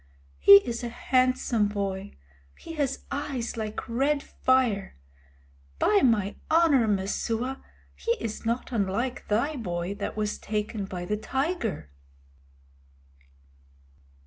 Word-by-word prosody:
He 200 - +9
is 235 0 -3
a 240 - -2
handsome 255 -3 +1
boy. 200 -1 -3 0.4
He 330 - -9
has 285 -4 -2
eyes 275 -4 -3
like 215 -2 -4
red 280 +5 +1
fire. 245 - +1 0.8
By 205 - +3
my 210 -5 +2
honor, 315 -8 +4
Messua, 225 +6 -1 0.3
he 465 - -1
is 230 - -5
not 235 +3 -2
unlike 230 +3 -1
thy 235 +9 +1
boy 175 -4 -3
that 205 - -5
was 210 -1 -2
taken 210 -1 -3
by 180 -2 -5
the 210 +3 -1
tiger." 265 - -2
230 Hz, 115 wpm, -27 LUFS, 205-260 Hz, 0.8 s, He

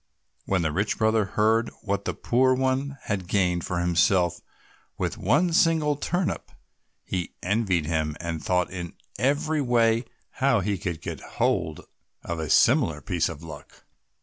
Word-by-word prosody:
When 95 -3 +1
the 80 - 0
rich 100 +7 -1
brother 110 -1 +2
heard 110 +3 +2
what 100 -1 -2
the - - -2
poor 130 +2 +2
one 130 +2 -1
had 95 -4 -3
gained 90 -3 +1
for 90 - -2
himself 85 0 +2 0.6
with - - -2
one 155 - +2
single 160 -5 +3
turnip, 175 +5 -2 0.5
he 90 -2 -4
envied 95 -4 +1
him, 75 -1 -1
and 80 -2 -4
thought 90 -1 +1
in 90 -2 -6 0.3
every 150 +3 +1
way 115 -2 +2 0.3
how 135 -5 +2
he 105 +3 -1
also 95 - -3
could 85 -3 -3
get 85 -5 -5
hold 80 -1 -1 0.4
of 85 -1 -4
a 80 -2 -3
similar 115 - +4
piece 90 -1 -1
of 80 -1 -8
luck. 75 -3 -11
100 Hz, 155 wpm, -26 LUFS, 85-130 Hz, 0.6 s, similar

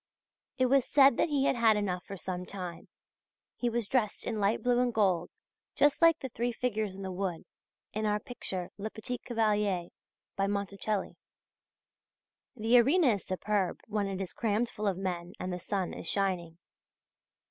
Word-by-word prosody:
It 255 - +3
was 270 +1 +4
said 275 -2 +5
that - - +2
he 285 -2 +2
had - - +3
had 225 -2 +4
enough 185 -3 -1
for 195 - -7
some 180 0 -4
time. 180 -3 -7 0.7
He 240 - 0
was 235 -2 -1
dressed 230 -5 0
in 220 - -2
light 205 +2 +1
blue 245 -1 +3
and 250 -1 +2
gold, 190 -6 +2 0.5
just 290 0 +3
like 330 -1 +7
the 265 - -6
three 240 +1 -1
figures 220 -5 -2
in 195 - -7
the 190 - -4
wood, 180 -2 -3 0.5
in 215 0 -1
our 210 0 +1
picture 190 -6 -5
"Le 215 +2 -3
Petit 245 +3 -5
Cavalier," 210 -6 0 0.5
by 195 - +1
Monticelli. 200 0 -2 1.4
The 235 +1 +5
arena 285 +5 +4
is 205 -4 0
superb 190 0 -1
when 210 -2 -1
it 195 -1 -4
is 190 -2 -4
crammed 225 +1 0
full 210 -1 -3
of 190 -3 0
men 180 -2 -3
and 185 0 -3
the 180 - -4
sun 190 -1 -2
is - - -7
shining. 180 -4 -1
210 Hz, 175 wpm, -30 LUFS, 190-240 Hz, 1.4 s, like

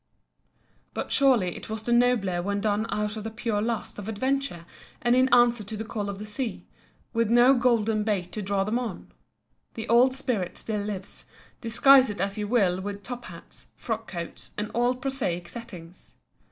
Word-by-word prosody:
But - - -4
surely 245 -11 +3
it - - -9
was 220 0 -4
the 240 - +1
nobler 235 -8 +2
when 200 +2 -1
done 210 +1 0
out 210 +1 -2
of 215 - -5
the 225 - -3
pure 225 -2 -2
lust 230 -1 -3
of 205 +1 -6
adventure 260 -5 -2 0.3
and 240 0 +3
in 255 +1 +3
answer 240 -2 +5
to 215 +2 -5
the 220 - -3
call 210 -2 -4
of 200 - -5
the 210 - -7
sea, 225 +3 -4 0.5
with 230 -2 +1
no 240 +3 +6
golden 225 -4 +2
bait 195 -5 -1
to 215 - -4
draw 195 0 0
them 215 +5 0
on. 230 -7 -6 0.6
The 225 - -5
old 250 +3 +5
spirit 235 -9 -2
still 210 -2 -2
lives, 200 -2 -6 0.4
disguise 260 +3 +6
it 205 - -5
as 195 +1 -1
you 210 -1 -3
will 195 -6 +2
with 200 +1 -6
top 245 +3 -6
hats, - - -12
frock 225 -1 -4
coats, 170 -2 -7
and 210 0 -3
all 245 +1 +2
prosaic 250 -10 -3
settings. 180 -7 -10
220 Hz, 185 wpm, -26 LUFS, 200-240 Hz, 0.6 s, no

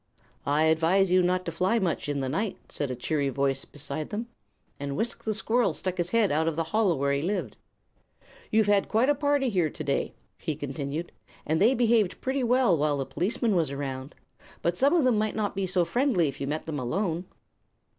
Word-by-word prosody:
"I 145 +2 +3
advise 165 +4 +3
you 185 0 +5
not 180 +1 +1
to 170 - -2
fly 185 +7 +1
much, 180 -7 -1
in 140 -1 -1
the 135 - -1
night," 195 +10 -2
said 145 - -3
a 125 - -3
cheery 140 +3 -1
voice 135 +1 -1
beside 145 +1 -5
them, 230 +3 -4 0.5
and 140 -1 -4
Wisk 235 +1 -2
the 220 - -1
squirrel 230 +3 +1
stuck 185 -1 -3
his 175 0 0
head 225 -2 +2
out 160 +2 +1
of 165 - 0
the 165 - 0
hollow 215 -6 +3
where 140 0 0
he 140 - 0
lived. 195 +6 -2 0.9
"You've 220 0 +3
had 205 -1 +2
quite 230 +5 +3
a - - +5
party 285 -1 +1
here 180 -7 +1
today," - - -2 0.2
he 155 - -3
continued, 145 +3 -4 0.3
"and 160 +3 0
they 235 +6 +5
behaved 230 -5 +2
pretty 265 0 -1
well 245 -5 +4
while 150 -1 +1
the 135 - -2
policeman 210 - 0
was 165 -4 +2
around. 135 -1 -5 0.5
But 170 0 +1
some 280 - +3
of 330 - +4
them 245 -4 +3
might 215 0 -1
not 210 -2 -1
be 195 -1 -1
so 180 -1 +2
friendly 210 - +2
if 140 - -6
you 140 - -2
met 155 +2 -3
them 155 -3 -3
alone." 170 - -1
180 Hz, 210 wpm, -27 LUFS, 145-220 Hz, 0.9 s, you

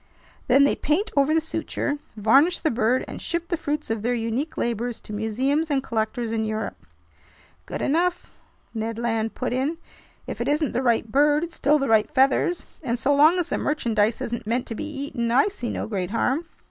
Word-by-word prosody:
Then 270 +3 +6
they 280 - +3
paint 385 +9 0
over 280 +1 +3
the 320 - +4
suture, 320 -2 -3 0.2
varnish 275 - +4
the 315 - +1
bird, 235 +2 +1
and - - -7
ship 340 0 -3
the 345 - +1
fruits 300 -5 -3
of 225 -2 -1
their 245 +3 0
unique 235 +7 -2
labors 235 0 -2
to 210 - -9
museums 260 +9 0
and 275 -2 +1
collectors 225 0 -2
in 225 -1 0
Europe." 215 0 -4 0.8
"Good - - -4
enough!" 345 +5 0 0.4
Ned 225 0 -3
Land 225 -1 -1
put 250 -1 -2
in. 275 +6 -1 0.5
"If - - -5
it - - -1
isn't 300 -1 +1
the 245 - -1
right 230 -3 +1
bird, 295 +4 +4
it's 340 -1 -5
still 300 +2 +3
the 275 -2 -1
right 220 -2 +3
feathers, 270 +6 +2 0.2
and 245 -5 -1
so 265 +5 +2
long 305 +5 +6
as 350 -1 -1
the - - -1
merchandise 225 -7 0
isn't 235 -2 -4
meant 240 +2 0
to - - -5
be 265 - -5
eaten, 270 -5 -3
I 270 - +4
see 245 - -5
no - - -3
great 190 -5 -3
harm!" 265 +9 0
260 Hz, 200 wpm, -24 LUFS, 225-300 Hz, 0.8 s, Then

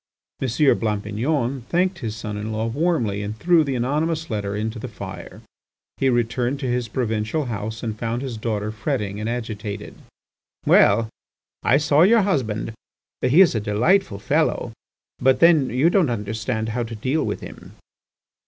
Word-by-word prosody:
M. 135 - 0 0.3
Blampignon 115 +5 -1
thanked 180 +1 +1
his 110 -4 -4
son 105 -1 -5
in 105 +1 -4
law 110 +1 -1
warmly 115 - 0
and 105 +2 -5
threw 170 +5 +4
the 140 -3 -2
anonymous 155 +5 -1
letter 100 -2 -2
into 110 +2 -3
the 125 - -5
fire. 95 -6 -9 0.5
He 135 - +2
returned 120 +2 0
to - - -2
his 120 -1 -1
provincial 110 +5 -1
house 110 -1 -5
and 110 -2 -3
found 115 +2 -2
his 130 -4 -4
daughter 110 -1 -2
fretting 105 -2 -3
and 110 +1 -2
agitated. 110 -3 -5 0.7
"Well! 110 +2 +5 0.5
I - - +4
saw 150 0 +3
your 215 +4 +6
husband. 115 - -1 0.5
He 145 +9 +5
is 185 - +6
a 110 - 0
delightful 110 - +2
fellow. 100 - 0 0.5
But 130 +1 +3
then, 165 -6 +5
you 135 +8 +2
don't 180 -8 +3
understand 110 +1 -2
how 120 +2 -2
to 115 -1 -5
deal 130 +8 0
with - - -3
him." - - -11
115 Hz, 160 wpm, -22 LUFS, 110-140 Hz, 0.7 s, your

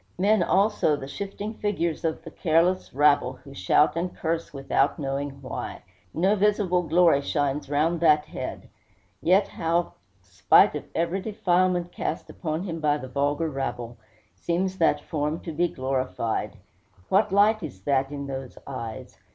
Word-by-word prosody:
Men, 205 +2 +3
also, 195 -3 +2
the 135 -2 -7
shifting 200 +6 -5
figures 190 -7 -2
of 160 0 -2
the 165 - -9
careless 170 +3 +1
rabble, 140 -2 +3
who 135 +1 -14
shout 95 +11 +3
and 175 +2 -2
curse 165 0 -2
without 140 0 0
knowing 140 -1 -3
why. 130 - -6 0.3
No 190 - +2
visible 200 -3 +2
glory 165 -3 +4
shines 145 -1 -1
round 155 +4 +1
that 150 -2 +4
head; 130 -4 -6 0.5
yet 190 +4 +4
how, 170 +1 -1 0.3
spite 90 -1 +4
of - - -5
every 170 +3 0
defilement 180 -3 +1
cast 160 - -4
upon 160 0 -3
him 165 -4 -4
by 150 -1 +2
the 130 - -8
vulgar 145 +4 0
rabble, 120 -3 -4 0.4
seems 185 +2 -2
that 165 - +3
form 150 +1 -2
to 165 - -6
be 170 +3 +1
glorified! 130 -5 -2 0.5
What 200 +1 +3
light 210 +2 +4
is 125 - -8
that 135 +1 +1
in 140 -1 -5
those 135 -2 -6
eyes! 115 -5 -7
160 Hz, 150 wpm, -25 LUFS, 140-180 Hz, 0.5 s, glory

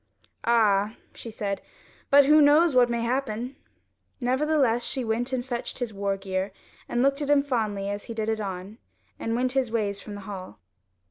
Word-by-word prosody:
"Ah," 215 -2 +3 0.2
she 230 - -9
said, 205 -2 -3 0.5
"but 280 0 +7
who 300 +2 +6
knows 300 +2 +5
what 245 -1 +5
may 235 -1 -1
happen?" 250 0 -2 0.6
Nevertheless 260 -2 +2
she 260 - -3
went 235 +3 -1
and 250 -2 -2
fetched 240 -2 -4
his 245 -4 -3
war 200 0 -1
gear 190 0 -3 0.4
and 240 +1 +1
looked 275 +2 +2
at 290 - -2
him 290 -1 +5
fondly 215 -7 -1
as 205 0 -4
he 230 - -7
did 220 -1 -2
it 220 0 0
on, 195 +2 -6 0.4
and 225 0 -1
went 250 +1 +1
his 265 -2 0
ways 205 -3 -1
from 205 0 -8
the 205 - -7
hall. 190 - -8
230 Hz, 185 wpm, -26 LUFS, 205-260 Hz, 0.6 s, but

